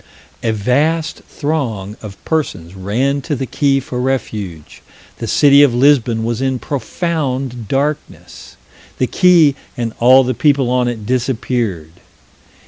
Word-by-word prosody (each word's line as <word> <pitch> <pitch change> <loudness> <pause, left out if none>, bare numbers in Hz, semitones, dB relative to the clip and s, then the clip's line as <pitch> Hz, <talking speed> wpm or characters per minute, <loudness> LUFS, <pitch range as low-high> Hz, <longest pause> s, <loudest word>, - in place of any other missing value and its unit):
A 115 - -1
vast 145 +10 0
throng 120 -10 -3
of 100 -3 -9
persons 95 - -2
ran 120 +9 -1
to 150 +1 -3
the 135 - -3
quay 135 +1 +1
for 125 -2 -5
refuge. 105 - -4 0.4
The 115 - -4
city 140 +5 +5
of 140 -5 +4
Lisbon 125 -4 +3
was 115 +1 -2
in 130 -1 0
profound 135 - -3
darkness. 140 +5 -4 0.4
The 130 - +1
quay 170 -1 +4 0.2
and 115 -2 -3
all 130 +3 +6
the 130 0 -1
people 140 -2 +2
on 125 -1 +1
it 115 -3 -4
disappeared. 120 - -2
130 Hz, 135 wpm, -16 LUFS, 115-140 Hz, 0.4 s, all